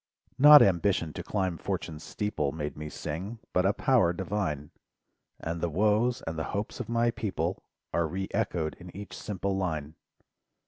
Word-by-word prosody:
Not 150 +1 +10
ambition 85 -3 +2
to - - -5
climb 95 -5 -2
Fortune's 80 -1 -4
steeple 80 -7 -2
Made 75 -1 -4
me 75 0 -6
sing, 95 +11 -5 0.2
but 90 +1 +3
a 100 - +3
power 115 -11 +3
divine; 85 -5 -3 0.7
And 85 0 -4
the 85 - 0
woes, 110 - +2
and 80 0 -3
the - - -1
hopes 105 +5 -4
of 120 -3 -5
my 120 0 +2
People! 95 -6 -2 0.3
Are 85 -1 +2
re 95 +4 -3
echoed 80 -2 -1
in 90 - -10
each 100 0 -8
simple 100 -1 -3
line. 80 -6 -2
90 Hz, 165 wpm, -29 LUFS, 80-105 Hz, 0.7 s, Not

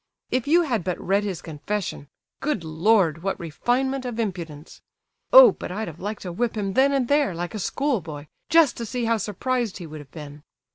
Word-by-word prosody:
If 255 0 0
you 340 +4 +5
had 240 - -1
but 180 0 -2
read 200 +2 +1
his 190 -5 -4
confession—good 175 - -5
Lord! 165 +1 +2
what 195 +2 -2
refinement 255 - -1
of 240 -2 -5
impudence! 170 -8 -5 0.5
Oh, - - +10
but - - -7
I'd 215 +4 -3
have 170 0 -9
liked 205 +2 -5
to 180 - -5
whip 230 +5 -2
him 195 -2 -2
then 270 +5 +4
and 270 -3 +1
there, 285 - +2
like 175 +3 -4
a 215 - -4
schoolboy, 175 - -2 0.2
just 325 -5 +5
to 235 - -4
see 245 +1 -2
how 230 0 +2
surprised 225 +2 -2
he 180 - -8
would 155 -1 -9
have 145 -2 -12
been! 150 -1 -10
205 Hz, 195 wpm, -24 LUFS, 170-250 Hz, 0.5 s, Oh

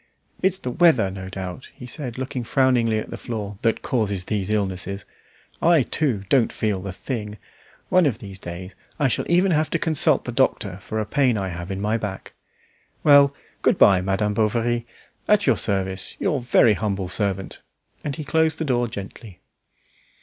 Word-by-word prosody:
"It's 190 0 +2
the 125 - -5
weather, 130 - +4
no 95 -1 -7
doubt," 95 +3 -7
he 125 - -10
said, 125 -1 -7
looking 130 -1 -4
frowningly 120 -3 +2
at 110 - -5
the - - -6
floor, 105 -4 -5
"that 115 -1 0
causes 105 -7 -1
these 105 -2 -2
illnesses. 100 -2 -2 0.6
I, 165 -4 +5
too, 120 -8 -1
don't 125 -2 +3
feel 105 -4 -1
the 95 0 -5
thing. 105 +1 -5 0.5
One 180 -3 +4
of 120 -6 -1
these 100 -4 -10
days 90 +2 -8 0.2
I 145 - +2
shall 125 - -1
even 180 +3 +4
have 155 -1 +2
to - - 0
consult 160 -2 +2
the - - -3
doctor 90 - 0
for 110 +3 -5
a 110 - -1
pain 130 -2 +2
I 95 -2 -2
have 85 0 -6
in 95 0 -3
my 105 +3 0
back. 100 -4 -6 0.7
Well, 140 -1 +6 0.3
good - - +3
bye, 95 -2 +6
Madame 95 +2 0
Bovary. 115 +2 0 0.4
At 210 -1 +4
your - - +4
service; 95 -2 -2
your 140 - 0
very 120 -2 +4
humble 100 -1 -2
servant." 95 0 -3 0.4
And 145 - -3
he 155 - -5
closed 160 +1 +1
the 160 - -2
door 120 -3 +1
gently. 100 -2 -9
110 Hz, 180 wpm, -23 LUFS, 95-135 Hz, 0.7 s, Well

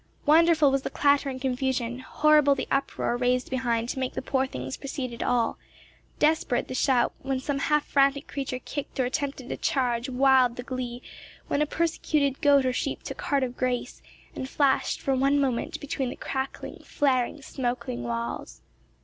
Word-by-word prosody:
Wonderful 315 -1 +5
was 275 0 +1
the - - -4
clatter 285 -1 +2
and 260 -1 -5
confusion, 255 -2 -1
horrible 295 +1 +4
the - - -4
uproar 275 -3 0
raised 250 +1 0
behind 235 -3 0
to 265 - -3
make 260 -1 -2
the - - -2
poor 265 0 0
things 130 - -5
proceed 265 -3 -5
at 235 - -7
all, 240 -2 +1 0.6
desperate 300 -5 +1
the - - -5
shout 255 -2 +2
when 265 -1 -1
some 275 +1 -2
half 300 +1 +1
frantic 275 0 +2
creature 270 -2 -4
kicked 275 +2 -6
or 260 - +3
attempted 275 -1 -3
a - - -3
charge 245 -2 0
wild 260 -1 +4
the 245 - -6
glee 250 -1 -5 0.5
when 285 - +1
a 300 - +2
persecuted 305 -4 0
goat 285 -3 +5
or 255 - +1
sheep - - -3
took - - -6
heart 280 -2 +1
of 250 -1 -3
grace, 250 -1 -2 0.3
and 260 - -5
flashed 280 -2 +1
for 270 - 0
one 275 +2 +3
moment 260 -4 -1
between 275 -2 -3
the - - -6
crackling, 265 0 -5
flaring, 265 0 0
smoking 245 - -3
walls. 115 - -4
265 Hz, 175 wpm, -26 LUFS, 250-280 Hz, 0.6 s, Wonderful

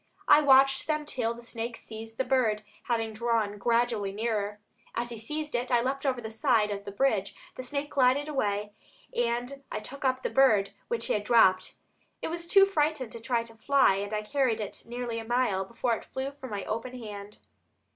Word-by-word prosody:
I 300 - +8
watched 270 -1 +5
them 305 -1 0
till 235 -5 -1
the 235 - -11
snake 235 0 -5
seized 225 0 -8
the - - +1
bird, 225 -6 +1 0.2
having 225 -2 -1
gradually 230 -1 0
drawn - - -11
nearer. 210 -2 -2 0.4
As 240 +1 -1
he 235 - -6
seized 300 +6 -4
it, 245 +1 -1
I 240 -1 +4
leaped 275 +2 -1
over 255 -2 +1
the 220 -2 -6
side 220 -3 +2
of 200 0 -5
the 200 - -5
bridge; 205 -3 0 0.2
the - - -7
snake 280 +3 -4
glided 270 +2 +3
away 210 -7 -1 0.4
and 240 +3 -1
I - - -2
took 270 +7 -8
up 260 -1 +1
the - - -1
bird, 215 -8 +4 0.2
which 230 -1 -2
he - - 0
had 205 - 0
dropped. 190 -5 +4 0.4
It - - -3
was 340 +1 -4
too 390 +2 +7
frightened 305 - 0
to 230 - -7
try 230 0 0
to 230 -1 -15
fly 245 -2 +3
and 200 +1 -4
I 215 0 -1
carried 255 -1 +1
it 210 -2 -5
nearly 240 -1 -4
a - - -6
mile 225 -5 +1
before 235 +3 -1
it - - -4
flew 265 +1 -4
from 275 -2 -10
my 205 -2 -4
open 240 +4 -4
hand." 210 -3 -8
235 Hz, 205 wpm, -28 LUFS, 215-265 Hz, 0.4 s, I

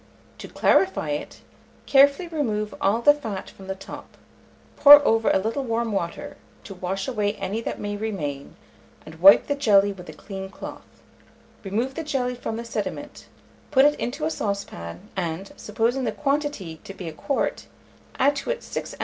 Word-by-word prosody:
To - - -8
clarify 375 - +2
it, 145 - -5 0.4
carefully 280 +5 +4
remove 220 -10 -2
all 220 +4 +1
the 290 - +8
fat 220 -10 -6
from 190 - -14
the 190 - -3
top, 195 - -11 0.6
pour 290 0 +11
over 225 0 +3
a - - +4
little 225 +8 -2
warm 230 -2 -1
water, 170 -4 -4 0.3
to 200 - -9
wash 190 +3 -4
away 210 -5 0
any 215 +2 -3
that - - -5
may 205 0 -3
remain, 155 -10 -5 0.5
and 160 +1 -12
wipe 195 +2 +8
the 285 - 0
jelly 205 -8 +3
with 180 -3 -12
a - - -8
clean 190 +3 -8
cloth; - - -10 0.8
remove 225 +7 -2
the 325 - -5
jelly 265 -5 -1
from 240 -2 -5
the 235 - -6
sediment, 225 +6 -5 0.4
put 270 -1 +5
it 295 - +5
into 280 +6 -3
a 320 - -1
saucepan, 145 - -5
and, 180 +1 -4
supposing 230 +5 -1
the - - 0
quantity 275 - -2
to 195 - -9
be 180 - -7
a 160 - -6
quart, 275 - -2 0.5
add 280 +2 +3
to 275 - -5
it - - -2
6 - - -6
oz. - - -22
215 Hz, 175 wpm, -24 LUFS, 190-275 Hz, 0.8 s, pour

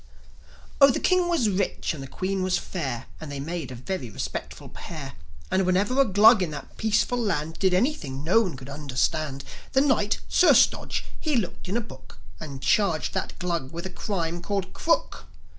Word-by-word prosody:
Oh, 275 - +10
the 255 - +1
King 365 -1 +3
was 325 -10 +2
rich, 195 -2 -1
and 150 - -7
the 135 - -7
Queen 190 +6 -2
was 185 0 +1
fair, 155 -10 -4
And 155 -2 -7
they 140 - -5
made 160 0 -4
a - - -6
very 130 0 -4
respectable 105 - -6
pair. - - -8 0.4
And 190 +1 +3
whenever 200 +9 +2
a - - +4
Glug 210 +1 +6
in 180 - 0
that 150 -2 -8
peaceful 220 +3 +1
land, 160 -8 -2
Did 190 -1 +3
anything 180 - 0
no 185 +8 +4
one 180 -10 -3
could 130 0 -10
understand, 140 0 -2 0.3
The 265 - +5
Knight, 240 -7 +2
Sir 365 - +5
Stodge, - - +2
he 305 -3 0
looked 195 -5 -2
in 205 - 0
a - - 0
book, 210 - -13 0.2
And 135 -3 -8
charged 195 -5 +2
that 190 - -3
Glug 170 -7 -2
with 170 +2 -6
a 190 - -5
crime 175 -4 -3
called 195 +1 -3
Crook. 330 - 0
185 Hz, 190 wpm, -26 LUFS, 150-215 Hz, 0.4 s, Oh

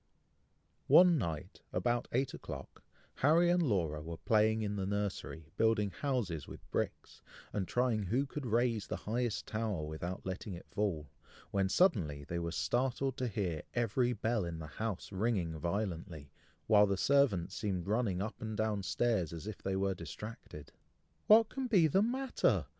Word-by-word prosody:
One 175 -3 +7
night, 80 -7 -4
about 120 0 0
eight 130 +2 0
o'clock, - - -8 0.4
Harry 170 +5 +4
and 175 0 +3
Laura 85 - 0
were 80 +1 -6
playing 110 +2 +2
in 105 -1 -2
the 95 -2 -2
nursery, 100 -6 -3
building 110 -3 +2
houses 110 - -2
with - - -11
bricks, - - -3 0.3
and 95 -3 -1
trying 125 -3 +1
who 115 +9 0
could 140 -1 -5
raise 115 -2 +1
the - - -2
highest 115 +1 -1
tower 110 -8 -2
without 85 +4 -5
letting 95 +1 -4
it 85 - -11
fall, 90 -8 -1 0.4
when 95 -1 +1
suddenly 90 - +2
they 85 +4 -3
were 85 0 -3
startled 130 +6 0
to 130 - -1
hear 95 -8 -2
every 120 +1 +1
bell 110 -1 0
in 85 -1 -4
the 80 - -6
house 100 +6 -4
ringing 95 -6 -1
violently, 85 -5 -3 0.3
while 105 -2 +6
the 100 -1 0
servants 130 -10 +3
seemed 95 -5 -2
running 100 -3 0
up 110 - -6
and 110 -1 -4
down 110 -2 0
stairs, 100 -3 0
as 85 +2 -7
if 110 -1 -6
they 95 0 -1
were 95 0 +1
distracted. 90 -2 -9 0.6
"What 220 +1 +8
can 265 -1 -3
be 195 -9 +5
the 175 +6 +3
matter!" 255 +4 +1
105 Hz, 165 wpm, -34 LUFS, 90-120 Hz, 0.6 s, What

